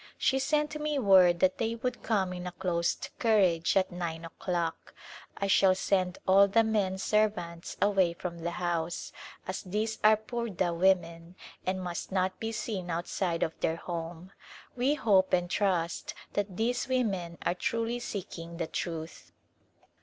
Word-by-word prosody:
She 265 - +2
sent 300 +2 0
me 300 -1 0
word 185 -7 +5
that 185 0 +3
they 225 0 0
would 245 +1 -3
come 195 -5 0
in 180 0 -6
a - - -4
closed 170 -2 -1
carriage 190 -8 +3
at 190 0 +2
nine 170 -2 -4
o'clock. 170 0 -3 0.4
I 200 - -1
shall 195 -1 +5
send 185 -1 0
all 195 +1 +7
the 225 +3 +4
men 205 -4 0
servants 195 -5 -1
away 195 -4 +3
from 170 0 -6
the 170 +1 -2
house, 170 -1 -2 0.3
as 185 +1 -3
these 215 +4 -2
are 215 0 +7
purdah 220 -6 -2
women, 170 -1 +1 0.3
and 185 0 -1
must 175 0 -5
not 185 0 0
be 225 0 -3
seen 215 -5 -4
outside 170 +1 -1
of 160 - -1
their 160 - 0
home. 170 +1 -6 0.4
We 260 +4 +2
hope 200 -8 +3
and 175 -1 +3
trust 175 -3 -1 0.2
that 200 -3 -2
these 245 +3 0
women 195 -10 -1
are - - +2
truly 230 +5 -1
seek 200 -7 -6
ing 165 0 -8
the 165 - -1
Truth. 160 0 -5
185 Hz, 160 wpm, -30 LUFS, 170-215 Hz, 0.4 s, all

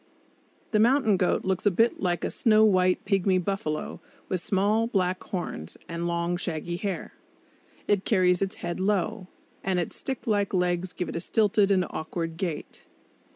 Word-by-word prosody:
The 215 - +3
mountain 235 -2 +4
goat 180 -1 +1
looks 190 +2 0
a - - +8
bit 225 +5 +2
like 175 -2 -1
a - - -1
snow 220 -2 +4
white 185 -3 +3
pigmy 195 -2 +2
buffalo 180 -4 -3 0.3
with 185 -2 -1
small 210 +5 +1
black 185 -4 0
horns, 175 - -5
and 170 +1 -3
long, 170 +1 -1
shaggy 175 0 -3
hair. 195 -1 -4 0.7
It 205 -2 +2
carries 180 -3 +3
its 195 -1 -1
head 175 +1 -3
low, 200 +1 0 0.4
and 190 -1 0
its 175 - -3
stick 265 -2 -4
like 205 -3 +1
legs 180 0 0
give 180 - -4
it - - -6
a 165 - -2
stilted 210 -1 +2
and 185 -2 +3
awkward 165 +1 -4
gait. 170 -4 -5
185 Hz, 165 wpm, -27 LUFS, 175-205 Hz, 0.7 s, a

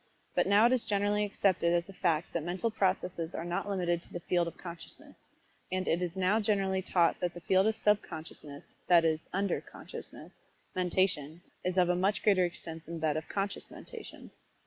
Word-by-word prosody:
But - - +2
now 205 +3 +6
it 240 - +5
is 245 -3 +1
generally 205 0 +2
accepted 190 -4 +2
as 175 0 +1
a 195 - -10
fact 170 -4 0
that 170 - 0
mental 180 +7 -1
processes 185 -4 -1
are - - -3
not 175 +3 -2
limited 175 -3 0
to - - -7
the 175 - -3
field 175 0 +1
of 170 - -7
consciousness, 170 -2 -9 0.6
and 185 0 -1
it 170 - +2
is 180 0 -2
now 190 +3 +2
generally 195 -3 +1
taught 175 -2 +2
that 175 -1 -2
the 175 - -8
field 190 +3 +3
of 220 0 +1
sub 210 -1 +3
consciousness 155 -3 -10
(that 170 -2 +6
is, 160 -1 +2
"under" 195 0 0
conscious) - - -10 0.6
mentation, 175 -4 0 0.2
is 180 +1 -1
of 180 -1 +5
a 180 - +3
much 195 +3 +1
greater 195 -4 +5
extent 165 -2 -6
than 165 0 -5
that 155 -2 +1
of 155 +1 -4
conscious 200 0 -3
mentation. - - -10
180 Hz, 195 wpm, -31 LUFS, 170-195 Hz, 0.6 s, now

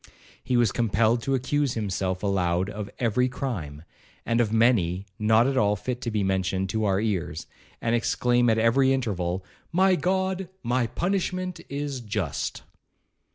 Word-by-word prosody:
He 125 - +1
was 120 -4 +3
compelled 115 0 +2
to 135 +3 0
accuse 135 +1 0
himself 95 -3 -2
aloud 95 -1 +1
of 105 -1 -6
every 125 +2 +1
crime, 90 - -5 0.4
and 115 +1 +2
of 110 -3 0
many 105 -6 +2
not 110 +2 +4
at 135 0 0
all 105 -3 +3
fit 125 +4 -4
to 120 - -2
be 105 -2 0
mentioned 95 0 0
to 110 +1 0
our 95 -1 +2
ears, 95 -8 -2 0.4
and 115 - +1
exclaim 120 +1 +2
at 110 - +3
every 130 +4 +4
interval, 95 -8 -2 0.3
'My 190 +3 +4
God, 190 +2 -1
my 120 0 +1
punishment 185 - -2
is 140 -2 -3
just.' 105 -9 -3
115 Hz, 155 wpm, -26 LUFS, 100-130 Hz, 0.4 s, not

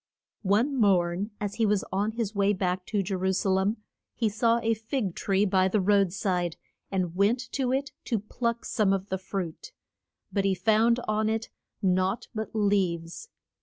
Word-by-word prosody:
One 220 +8 +2
morn 190 -3 +2
as 205 -1 -3
he - - +5
was 205 -1 +2
on 205 +3 0
his 225 -3 -2
way 200 0 +2
back 185 -1 -2
to 205 -3 0
Je 195 +2 -3
ru 190 0 +1
sa 190 +1 +1
lem 190 +4 +1 0.4
he 225 -3 +1
saw 230 +2 +2
a 225 0 +3
fig 220 -2 -2
tree 195 +2 +1
by 190 -1 +3
the 210 +3 +1
road 200 -1 +3
side, 180 -3 -1 0.3
and 185 -3 -1
went 205 +6 +3
to 260 -2 0
it 270 +1 -1
to 235 - 0
pluck 235 +3 -3
some 205 -3 +2
of 195 0 -2
the 190 - -2
fruit. 190 - -5 0.6
But 200 - +1
he 195 -1 +2
found 220 +5 +3
on 215 0 +1
it 225 0 -2 0.3
naught 185 +3 +1
but 220 -1 -3
leaves. 195 - 0
200 Hz, 180 wpm, -27 LUFS, 190-220 Hz, 0.6 s, he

